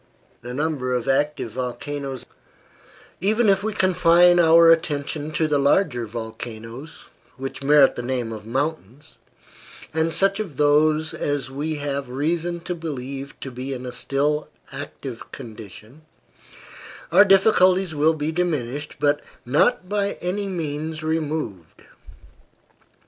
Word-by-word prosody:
NUMBER 130 +1 -2
OF 125 0 -2
ACTIVE 135 -3 0
VOLCANOES 130 +2 -5 1.0
Even 215 +4 +2
if 195 0 +3
we 220 +2 -2
confine 175 -2 +4
our 165 0 +7
attention 150 -2 0
to 155 +1 +1
the 145 -2 +1
larger 140 - +2
volcanoes, 115 +4 -8 0.3
which 135 0 -6
merit 145 0 +5
the - - -5
name 120 -2 -3
of 110 -1 -8
mountains, 135 +1 -4 0.7
and 160 +1 +1
such 195 +4 +1
of 180 -11 -5
these 150 +1 +3
as 140 -3 -2
we 150 +3 -3
have 140 -2 -3
reason 165 +6 -2
to 180 +1 -4
believe 140 -4 -6
to 135 - -6
be 130 +2 -5
in 125 0 -7
a 125 - -5
still 140 +4 -1 0.2
active - - -8
condition, 110 +4 -11 1.1
our - - +8
difficulties 190 -2 +4
will 155 +2 +3
be 150 +1 -2
diminished, 150 -5 -2
but 145 0 +2 0.2
not 145 +7 +2
by 200 0 0
any 195 +3 -3
means 155 -3 -4
removed. 155 - -3
150 Hz, 125 wpm, -23 LUFS, 130-165 Hz, 1.1 s, our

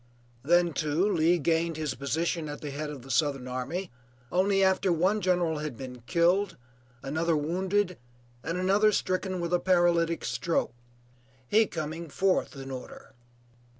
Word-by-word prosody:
Then, 175 +4 +3
too, 155 +6 +1
Lee 165 +2 +3
gained 165 +1 0
his 155 -3 -2
position 155 +4 -2
at 145 - -7
the 145 - -5
head 150 +2 -4
of 140 -4 -8
the 135 - -8
Southern 140 -4 +1
army 135 +9 -4 0.4
only 195 +2 +3
after 190 0 +3
one 185 +6 +2
general 175 -4 +1
had 150 -6 -5
been 125 -2 -8
killed, 180 +6 +2 0.5
another 160 +3 0
wounded, 185 +4 0 0.4
and 165 +2 -2
another 200 +4 +3
stricken 185 0 -1
with 170 0 -2
a 175 - +4
paralytic 175 -2 +2
stroke; 170 - -1 0.7
he 220 - +4
coming 160 +1 -5
fourth 185 +1 +1
in 135 0 -7
order. 130 0 -9
170 Hz, 150 wpm, -28 LUFS, 150-185 Hz, 0.7 s, a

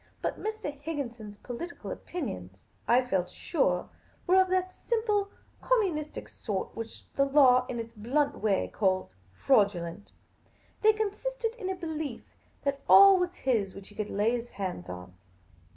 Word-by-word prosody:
But - - -3
Mr. 435 -8 -3
Higginson's 240 -9 -5
political 255 +11 -7
opinions, 95 - -6 0.2
I 250 +2 +4
felt 185 -7 0
sure, 180 - 0 0.4
were 375 +1 +6
of 375 - +1
that 370 0 0
simple 425 -4 0 0.3
communistic 360 -12 0
sort 200 -4 -4
which 225 0 -7
the 275 - +3
law 265 -3 +5
in 240 - -4
its 230 0 -6
blunt 275 +7 0
way 205 -3 +1
calls 185 - +1 0.2
fraudulent. 200 - +1 0.7
They 435 - +7
consisted 455 +3 -2
in 435 -6 -5
a 380 - -1
belief 315 -7 -4 0.4
that 280 -1 -1
all 390 -1 +9
was 360 0 -1
his 220 -7 0
which 195 -1 -10
he - - -15
could 210 -1 -3
lay 210 +3 +2
his 240 0 -3
hands 185 - -5
on. 90 0 -8
260 Hz, 150 wpm, -29 LUFS, -, 0.7 s, all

